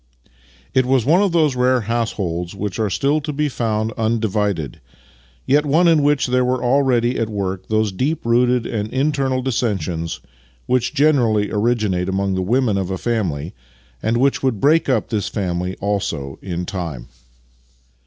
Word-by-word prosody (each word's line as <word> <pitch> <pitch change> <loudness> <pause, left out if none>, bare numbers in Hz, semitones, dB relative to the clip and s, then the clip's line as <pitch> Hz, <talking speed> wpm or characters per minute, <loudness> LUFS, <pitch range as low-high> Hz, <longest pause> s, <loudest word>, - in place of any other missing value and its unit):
It 130 -1 +2
was 130 -3 +2
one 170 +6 +4
of 200 -3 +2
those 155 -5 +2
rare 125 0 +2
households 100 -6 -2
which 100 +1 -4
are 110 -2 +1
still 140 +10 +1
to 150 - -4
be 150 +1 0
found 110 -4 -1
undivided, 105 - -1 0.6
yet 145 +2 +3
one 155 +4 +3
in 165 -3 +4
which 145 -1 +2
there 125 0 +2
were 125 0 0
already 125 -2 +2
at 115 - -1
work 95 -3 -3
those 110 -1 +1
deep 135 +11 -2
rooted 120 0 +2
internal 130 +4 -1
dissensions 95 -10 -2 0.5
which 125 +2 0
generally 120 -9 +2
originate 105 -5 0
among 95 0 0
the 95 - -1
women 110 +1 +1
of 95 -1 -3
a 95 - -2
family, 90 -10 -2 0.5
and 115 +2 0
which 135 +2 +2
would 130 -6 0
break 155 +4 +3
up 130 - +1
this 105 -4 -1
family 90 -2 -2
also 95 -9 -3
in 90 -2 -4
time. 80 -11 -5
115 Hz, 155 wpm, -20 LUFS, 95-130 Hz, 0.6 s, one